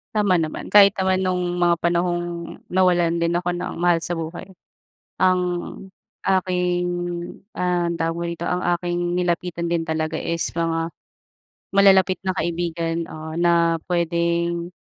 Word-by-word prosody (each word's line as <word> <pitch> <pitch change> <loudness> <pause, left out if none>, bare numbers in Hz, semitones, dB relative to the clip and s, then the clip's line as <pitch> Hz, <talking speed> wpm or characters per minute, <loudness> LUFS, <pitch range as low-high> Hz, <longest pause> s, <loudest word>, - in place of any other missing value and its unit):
Tama 200 -5 +3
naman, 155 -1 -4
kahit 200 -1 +7
naman 190 -1 +1
nung 180 -1 -1
mga 175 -1 +4
panahong 175 0 +1 0.5
nawalan 175 -2 +3
din 170 0 +1
ako 175 0 0
ng 175 0 -4
mahal 175 0 +2
sa 175 +1 -3
buhay. 165 +2 -6 0.7
Ang 185 -1 +3 0.9
aking, 180 -1 +1 0.7
ah, 180 -1 0
tawag 165 0 -1
mo - - -2
rito, 170 0 -5
ang 180 +1 0 0.2
aking 175 0 -2
nilapitan 175 -1 -1
din 165 -1 0
talaga 160 0 -1
is 170 0 -2
mga 165 0 -1 0.8
malalapit 190 -1 +5
na 185 - 0
kaibigan, 170 -1 -2
ah, 155 0 -7
na 170 -1 +3 0.2
puwedeng, 170 0 0
175 Hz, 135 wpm, -22 LUFS, 170-180 Hz, 0.9 s, kahit